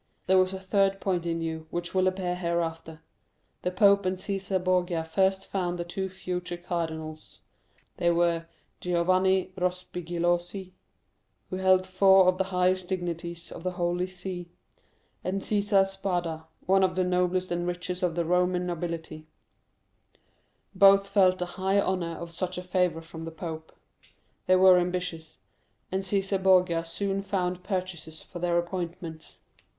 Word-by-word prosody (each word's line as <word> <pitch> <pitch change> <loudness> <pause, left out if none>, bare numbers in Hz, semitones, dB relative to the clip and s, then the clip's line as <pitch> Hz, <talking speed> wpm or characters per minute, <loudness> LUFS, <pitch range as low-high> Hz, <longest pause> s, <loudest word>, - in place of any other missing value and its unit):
There 190 0 +5
was 185 0 +3
a 190 - -5
third 195 0 +1
point 180 -4 -1
in 165 0 -1
view, 160 -1 -4
which 175 +1 -4
will 185 0 +3
appear 185 -1 -1
hereafter. 165 -2 -3 0.6
"The 180 - 0
pope 200 +2 +4
and 185 0 -1
Cæsar 190 -1 -2
Borgia 180 -2 +1
first 190 +4 +1
found 180 -2 -2
the 175 - -2
two 190 +2 -4
future 180 -1 -4
cardinals; 160 -3 -5 0.6
they 175 -1 +2
were 170 -1 +1 0.3
Giovanni 185 +1 +2
Rospigliosi, 180 0 -2 0.8
who 185 - -2
held 185 0 +4
four 190 0 +5
of 185 0 +3
the 190 - +2
highest 185 -1 +1
dignities 170 -2 -4
of - - -8
the 185 +1 -2
Holy 175 0 -1
See, 180 -1 -6 0.7
and 190 +2 -1
Cæsar 200 -1 +3
Spada, 175 -5 -3 0.2
one 195 +2 +4
of 185 -1 +1
the 185 - +2
noblest 180 0 0
and 175 0 -1
richest 180 0 -3
of 175 -3 0
the 170 -1 0
Roman 180 +1 +1
nobility; 165 -2 -5 1.5
both 195 0 +6
felt 190 -2 +4
the 180 - -2
high 190 +2 0
honor 185 -4 0
of 170 0 -7
such 180 +2 -3
a 180 - -4
favor 180 -2 0
from 165 0 -9
the 165 - -6
pope. 160 -1 -7 0.8
They 185 - +6
were 185 -1 +7
ambitious, 175 -3 -4 0.5
and 190 +1 0
Cæsar 195 0 -1
Borgia 180 -3 +4
soon 195 +4 -2
found 180 -2 -2
purchasers 180 -5 -4
for 175 - -10
their 175 0 +1
appointments. 170 -2 -5
180 Hz, 150 wpm, -27 LUFS, 170-190 Hz, 1.5 s, were